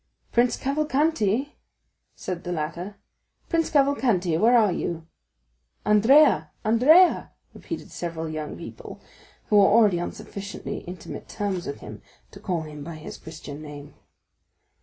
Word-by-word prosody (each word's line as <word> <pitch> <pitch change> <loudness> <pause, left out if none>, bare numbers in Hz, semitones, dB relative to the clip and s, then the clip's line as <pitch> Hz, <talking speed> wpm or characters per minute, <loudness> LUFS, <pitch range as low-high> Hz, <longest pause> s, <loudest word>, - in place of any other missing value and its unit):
"Prince 240 0 +2
Cavalcanti," 280 -3 0 0.6
said 180 -2 -5
the 175 - -4
latter; 175 +5 -4 0.5
"Prince 330 -2 +1
Cavalcanti, 255 - +2
where 230 +8 +5
are 215 -4 +4
you?" 165 -1 -3 0.8
"Andrea, 210 - +5 0.2
Andrea," 295 +12 +5 0.2
repeated - - -7
several 165 -2 -4
young 155 -1 -5
people, - - -10 0.5
who 210 - +5
were 200 -1 +7
already 205 -4 +4
on 175 - -3
sufficiently 200 0 -7
intimate 180 -1 -8
terms 195 -4 -3
with 140 - -6
him - - -9 0.3
to - - -12
call 175 -3 -2
him 150 -2 -9
by 165 +2 -7
his 155 - -9
Christian 155 -2 -9
name. 145 -1 -10
195 Hz, 130 wpm, -25 LUFS, 160-245 Hz, 0.8 s, were